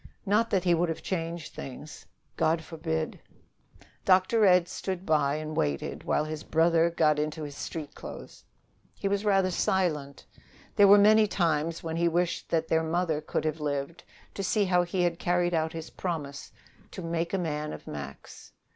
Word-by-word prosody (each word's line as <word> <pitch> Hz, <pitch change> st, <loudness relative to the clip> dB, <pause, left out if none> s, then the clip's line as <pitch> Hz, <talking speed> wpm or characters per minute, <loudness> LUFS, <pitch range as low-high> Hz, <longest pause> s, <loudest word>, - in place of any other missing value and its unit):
Not 215 Hz, +3 st, +2 dB
that 190 Hz, -3 st, +1 dB
he 175 Hz, -2 st, +3 dB
would 170 Hz, +1 st, +1 dB
have 165 Hz, -, -4 dB
changed 170 Hz, -3 st, -4 dB
things. 140 Hz, +3 st, -9 dB, 0.3 s
God 165 Hz, +1 st, +1 dB
forbid! 160 Hz, -1 st, -3 dB, 0.8 s
Dr. 195 Hz, +3 st, +4 dB
Ed 180 Hz, -1 st, +5 dB
stood 185 Hz, 0 st, -5 dB
by 150 Hz, -2 st, +2 dB
and 155 Hz, 0 st, -5 dB
waited 70 Hz, -, -2 dB
while 150 Hz, -, +1 dB
his 155 Hz, -1 st, -5 dB
brother 165 Hz, +1 st, +3 dB
got 155 Hz, -3 st, +2 dB
into 155 Hz, +1 st, -2 dB
his 145 Hz, -1 st, -7 dB
street 150 Hz, -1 st, -6 dB
clothes. -, -, -10 dB, 0.5 s
He 200 Hz, -, -3 dB
was 200 Hz, +1 st, 0 dB
rather 195 Hz, -3 st, +3 dB
silent. 155 Hz, -7 st, -1 dB, 0.5 s
There 205 Hz, -, +7 dB
were 200 Hz, +1 st, +9 dB
many 215 Hz, +1 st, +6 dB
times 165 Hz, -3 st, 0 dB
when 165 Hz, 0 st, -3 dB
he 170 Hz, 0 st, +2 dB
wished 175 Hz, +1 st, -1 dB
that 160 Hz, -1 st, 0 dB
their 160 Hz, 0 st, +2 dB
mother 160 Hz, -1 st, 0 dB
could 155 Hz, -, -3 dB
have 155 Hz, 0 st, -1 dB
lived 145 Hz, +3 st, -3 dB, 0.3 s
to -, -, -4 dB
see 205 Hz, +2 st, +2 dB
how 180 Hz, -1 st, +3 dB
he 175 Hz, +1 st, -1 dB
had 170 Hz, -1 st, 0 dB
carried 175 Hz, 0 st, +1 dB
out 160 Hz, -1 st, +1 dB
his 160 Hz, -1 st, -7 dB
promise 145 Hz, -6 st, -5 dB, 0.4 s
to 185 Hz, -, -8 dB
"make 165 Hz, 0 st, -2 dB
a 195 Hz, -, 0 dB
man 150 Hz, -3 st, -2 dB
of -, -, -9 dB
Max." 70 Hz, -2 st, -9 dB
165 Hz, 175 wpm, -28 LUFS, 155-180 Hz, 0.8 s, were